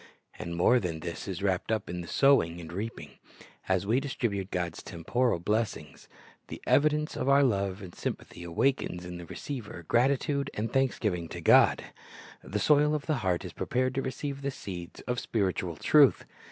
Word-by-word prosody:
"^ -, -, -20 dB, 0.4 s
And 85 Hz, 0 st, -4 dB
more 120 Hz, +9 st, +4 dB
than 85 Hz, -6 st, -4 dB
this 85 Hz, 0 st, -6 dB
is 95 Hz, 0 st, -4 dB
wrapped 95 Hz, +1 st, 0 dB
up 110 Hz, -, -1 dB
in 90 Hz, 0 st, -4 dB
the 85 Hz, -, -8 dB
sowing 85 Hz, -12 st, +3 dB
and 85 Hz, -1 st, -9 dB
the -, -, -10 dB
reaping. 110 Hz, +4 st, -6 dB, 0.5 s
As 95 Hz, 0 st, +2 dB
we 115 Hz, +5 st, +2 dB
distribute 115 Hz, -8 st, -2 dB
God's 90 Hz, -3 st, -3 dB
temporal 115 Hz, +7 st, 0 dB
blessings, 105 Hz, -3 st, -2 dB, 0.4 s
the -, -, -7 dB
evidence 150 Hz, +1 st, +2 dB
of 135 Hz, -, -1 dB
our 140 Hz, +1 st, +6 dB
love 100 Hz, -5 st, 0 dB
and 90 Hz, -2 st, -9 dB
sympathy 85 Hz, -, -5 dB
awakens 90 Hz, 0 st, 0 dB
in 90 Hz, 0 st, -7 dB
the 85 Hz, -, -9 dB
receiver 105 Hz, -, -7 dB
gratitude 140 Hz, +3 st, +2 dB
and 110 Hz, +2 st, -3 dB
thanksgiving 105 Hz, -10 st, 0 dB
to -, -, -6 dB
God. -, -, +5 dB, 0.6 s
The 105 Hz, -, -3 dB
soil 150 Hz, +7 st, +4 dB
of 150 Hz, -, -4 dB
the 155 Hz, -3 st, 0 dB
heart 90 Hz, -3 st, 0 dB
is -, -, -7 dB
prepared 130 Hz, +1 st, -1 dB
to 135 Hz, -, -1 dB
receive 135 Hz, +2 st, -4 dB
the 140 Hz, -, -1 dB
seeds 90 Hz, -9 st, -7 dB
of 125 Hz, 0 st, -2 dB
spiritual 95 Hz, -5 st, -1 dB
truth. 145 Hz, -, +5 dB
105 Hz, 180 wpm, -29 LUFS, 90-135 Hz, 0.6 s, our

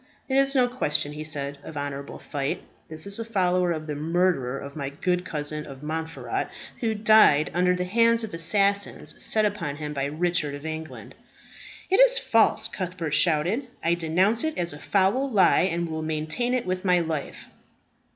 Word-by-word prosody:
"It 265 Hz, -, -1 dB
is 275 Hz, +1 st, +3 dB
no 250 Hz, -2 st, +4 dB
question," 150 Hz, -, -1 dB
he 150 Hz, +1 st, -6 dB
said, 140 Hz, -2 st, -2 dB
"of 155 Hz, -, -9 dB
honourable 140 Hz, -1 st, -5 dB
fight. 140 Hz, -1 st, -4 dB, 0.3 s
This 155 Hz, 0 st, -4 dB
is 200 Hz, +2 st, -2 dB
a -, -, -2 dB
follower 180 Hz, -5 st, +1 dB
of 155 Hz, -2 st, -3 dB
the 150 Hz, -, -4 dB
murderer 155 Hz, -4 st, 0 dB
of 140 Hz, +1 st, -8 dB
my 140 Hz, -3 st, -4 dB
good 180 Hz, +4 st, -1 dB
cousin 150 Hz, -2 st, -3 dB
of 135 Hz, 0 st, -11 dB
Montferat, 160 Hz, +1 st, -4 dB, 0.3 s
who 225 Hz, -2 st, -1 dB
died 210 Hz, -9 st, +5 dB
under 180 Hz, +1 st, +2 dB
the 180 Hz, -, -2 dB
hands 230 Hz, +4 st, +3 dB
of 220 Hz, -, -6 dB
assassins 200 Hz, +4 st, 0 dB
set 215 Hz, -1 st, +2 dB
upon 185 Hz, -9 st, -2 dB
him 150 Hz, 0 st, -5 dB
by 135 Hz, -1 st, -2 dB
Richard 155 Hz, -1 st, -1 dB
of 145 Hz, +2 st, -10 dB
England." 160 Hz, 0 st, -7 dB, 0.8 s
"It 385 Hz, -, +4 dB
is -, -, +7 dB
false!" 220 Hz, -1 st, +3 dB
Cuthbert 175 Hz, -5 st, -4 dB
shouted. 175 Hz, -, +2 dB, 0.2 s
"I 170 Hz, -, +2 dB
denounce 180 Hz, -, +2 dB
it 315 Hz, 0 st, -2 dB
as 170 Hz, -3 st, 0 dB
a 145 Hz, -, -9 dB
foul 205 Hz, -, +1 dB
lie, 190 Hz, -4 st, +4 dB
and 170 Hz, 0 st, -2 dB
will 160 Hz, -1 st, -4 dB
maintain 155 Hz, +11 st, -1 dB
it 255 Hz, -, -2 dB
with 185 Hz, 0 st, -2 dB
my 180 Hz, -2 st, +3 dB
life." 160 Hz, -4 st, -4 dB
170 Hz, 180 wpm, -25 LUFS, 150-205 Hz, 0.8 s, is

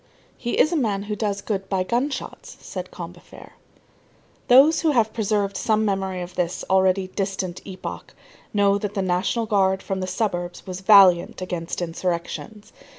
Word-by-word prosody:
"He 240 Hz, -, -3 dB
is 310 Hz, -, +4 dB
a -, -, 0 dB
man 210 Hz, -9 st, 0 dB
who 210 Hz, +1 st, -4 dB
does 205 Hz, -2 st, -2 dB
good 195 Hz, -3 st, -3 dB
by 190 Hz, -2 st, +1 dB
gun 240 Hz, +8 st, 0 dB
shots," 270 Hz, -, -7 dB
said -, -, -7 dB
Combeferre. -, -, -11 dB, 1.0 s
Those 280 Hz, +6 st, +6 dB
who 325 Hz, -, +2 dB
have 220 Hz, -4 st, +2 dB
preserved 205 Hz, -3 st, 0 dB
some 215 Hz, -1 st, +1 dB
memory 190 Hz, -2 st, -1 dB
of 175 Hz, +1 st, -9 dB
this 180 Hz, -1 st, -2 dB
already 190 Hz, 0 st, +3 dB
distant 190 Hz, -2 st, -3 dB
epoch 190 Hz, -1 st, -8 dB, 0.4 s
know 200 Hz, -1 st, +3 dB
that 205 Hz, 0 st, -4 dB
the 195 Hz, -, 0 dB
National 185 Hz, +6 st, 0 dB
Guard 195 Hz, -2 st, +1 dB
from 195 Hz, -1 st, -3 dB
the 185 Hz, -, -3 dB
suburbs 180 Hz, -3 st, -3 dB
was 185 Hz, -1 st, -6 dB
valiant 190 Hz, -3 st, +6 dB
against 175 Hz, -1 st, -4 dB
insurrections. 180 Hz, +5 st, -4 dB
195 Hz, 160 wpm, -23 LUFS, 185-215 Hz, 1.0 s, Those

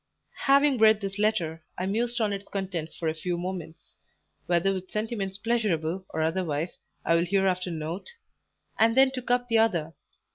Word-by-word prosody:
Having 275 Hz, -1 st, +5 dB
read 220 Hz, -1 st, +6 dB
this 195 Hz, -1 st, -4 dB
letter, 170 Hz, -7 st, 0 dB
I 185 Hz, -, -2 dB
mused 235 Hz, +5 st, 0 dB
on 215 Hz, -3 st, +1 dB
its 200 Hz, 0 st, -6 dB
contents 185 Hz, -5 st, -4 dB
for 165 Hz, -, -3 dB
a 155 Hz, -, +1 dB
few 170 Hz, +2 st, -3 dB
moments 175 Hz, -2 st, -7 dB, 0.5 s
whether 175 Hz, +3 st, +2 dB
with 185 Hz, -1 st, -5 dB
sentiments 210 Hz, -3 st, -3 dB
pleasurable 190 Hz, -6 st, -1 dB
or 160 Hz, -, -1 dB
otherwise 160 Hz, -1 st, -1 dB, 0.3 s
I 165 Hz, -, +3 dB
will 170 Hz, +1 st, +3 dB
hereafter 185 Hz, -1 st, +1 dB
note 165 Hz, +3 st, -4 dB, 0.7 s
and 225 Hz, +2 st, +4 dB
then 265 Hz, 0 st, +6 dB
took 255 Hz, -2 st, -6 dB
up 245 Hz, 0 st, +2 dB
the 230 Hz, -2 st, +3 dB
other. 170 Hz, -8 st, +1 dB
190 Hz, 170 wpm, -27 LUFS, 170-220 Hz, 0.7 s, read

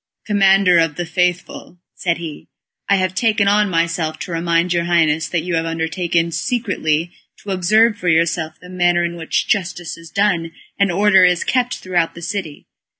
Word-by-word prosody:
"Commander 195 Hz, -3 st, +4 dB
of 165 Hz, -3 st, +1 dB
the 175 Hz, -, -3 dB
Faithful," 180 Hz, 0 st, -2 dB, 0.2 s
said 170 Hz, -2 st, -2 dB
he, 160 Hz, -3 st, -8 dB, 0.4 s
"I 200 Hz, -, +5 dB
have 185 Hz, -1 st, 0 dB
taken 210 Hz, 0 st, +1 dB
on 205 Hz, 0 st, +3 dB
myself 165 Hz, -2 st, -1 dB
to -, -, -6 dB
remind 170 Hz, +1 st, 0 dB
your 170 Hz, -1 st, 0 dB
Highness 160 Hz, -2 st, +1 dB
that 170 Hz, -3 st, -1 dB
you 175 Hz, 0 st, -4 dB
have 165 Hz, 0 st, 0 dB
undertaken 165 Hz, +1 st, -1 dB
secretly 175 Hz, -, -1 dB, 0.3 s
to 200 Hz, -, -5 dB
observe 210 Hz, +4 st, +2 dB
for 180 Hz, -, -5 dB
yourself 160 Hz, -1 st, 0 dB
the 180 Hz, -, -14 dB
manner 175 Hz, -1 st, +1 dB
in 170 Hz, 0 st, -4 dB
which 165 Hz, -2 st, -2 dB
justice 175 Hz, -4 st, -2 dB
is 165 Hz, -1 st, -13 dB
done 170 Hz, -5 st, 0 dB, 0.3 s
and 200 Hz, -2 st, +2 dB
order 195 Hz, +1 st, +4 dB
is 180 Hz, -1 st, +3 dB
kept 250 Hz, -1 st, 0 dB
throughout 175 Hz, -3 st, -1 dB
the 170 Hz, -, -10 dB
city. 175 Hz, -4 st, -5 dB
175 Hz, 175 wpm, -18 LUFS, 165-195 Hz, 0.4 s, I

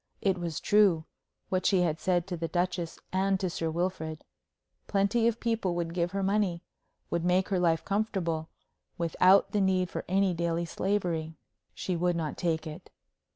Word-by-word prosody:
It 190 Hz, -2 st, +1 dB
was 170 Hz, -3 st, -3 dB
true, 200 Hz, -7 st, +4 dB, 0.4 s
what 185 Hz, -1 st, 0 dB
she 190 Hz, -3 st, +4 dB
had 160 Hz, -2 st, 0 dB
said 175 Hz, -2 st, +1 dB
to 185 Hz, -2 st, -4 dB
the 165 Hz, 0 st, -3 dB
Duchess 175 Hz, 0 st, -2 dB, 0.2 s
and 190 Hz, 0 st, +2 dB
to 185 Hz, -2 st, -1 dB
Sir 165 Hz, -1 st, -2 dB
Wilfrid. 160 Hz, -2 st, -3 dB, 0.6 s
Plenty 205 Hz, +4 st, +2 dB
of 235 Hz, 0 st, 0 dB
people 225 Hz, -6 st, 0 dB
would 170 Hz, -1 st, -2 dB
give 175 Hz, 0 st, 0 dB
her 195 Hz, +1 st, -2 dB
money, 190 Hz, -3 st, +1 dB, 0.5 s
would 170 Hz, -1 st, 0 dB
make 180 Hz, +1 st, +2 dB
her 190 Hz, -2 st, +1 dB
life 165 Hz, -2 st, +2 dB
comfortable, 185 Hz, -6 st, -1 dB, 0.5 s
without 180 Hz, +3 st, +4 dB
the 205 Hz, -, +1 dB
need 185 Hz, -1 st, +1 dB
for -, -, -4 dB
any 190 Hz, 0 st, +2 dB
daily 170 Hz, 0 st, -1 dB
slavery. 170 Hz, -3 st, -1 dB, 0.4 s
She 185 Hz, -, -2 dB
would 175 Hz, +1 st, +1 dB
not 160 Hz, -3 st, -2 dB
take 165 Hz, -2 st, -1 dB
it. 155 Hz, -1 st, -8 dB
180 Hz, 170 wpm, -29 LUFS, 165-195 Hz, 0.6 s, true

